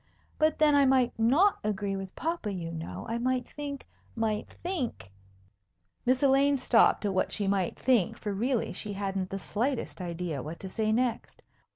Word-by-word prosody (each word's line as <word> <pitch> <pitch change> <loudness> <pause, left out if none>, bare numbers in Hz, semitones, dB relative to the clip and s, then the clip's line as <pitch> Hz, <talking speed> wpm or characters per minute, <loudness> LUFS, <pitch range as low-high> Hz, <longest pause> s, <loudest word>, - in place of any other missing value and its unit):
"But 310 0 +3
then 305 -1 +4
I 285 -1 +6
might 260 -2 +3
not 290 - +4
agree 205 -1 -1
with 195 -1 -6
papa, 325 -10 -2
you 170 -4 -4
know. 165 0 -6
I 230 +1 -2
might 255 +1 0
think, 285 -2 -6 0.3
might 220 -2 -1
think 285 - -4 0.5
" 90 -2 -47
Miss 255 +2 +3
Elaine 280 +1 +4
stopped 230 -4 +4
at 200 - 0
what 185 - 0
she 205 - -1
might 195 -2 0
think, 245 -8 +2
for 205 -1 -4
really 235 +4 0
she 210 -1 -4
hadn't 195 -1 -2
the 195 - -3
slightest 235 +2 -2
idea 170 -4 -3
what 155 +5 -7
to 190 - -6
say 215 +2 0
next. 235 +1 -1
220 Hz, 180 wpm, -29 LUFS, 195-265 Hz, 0.5 s, I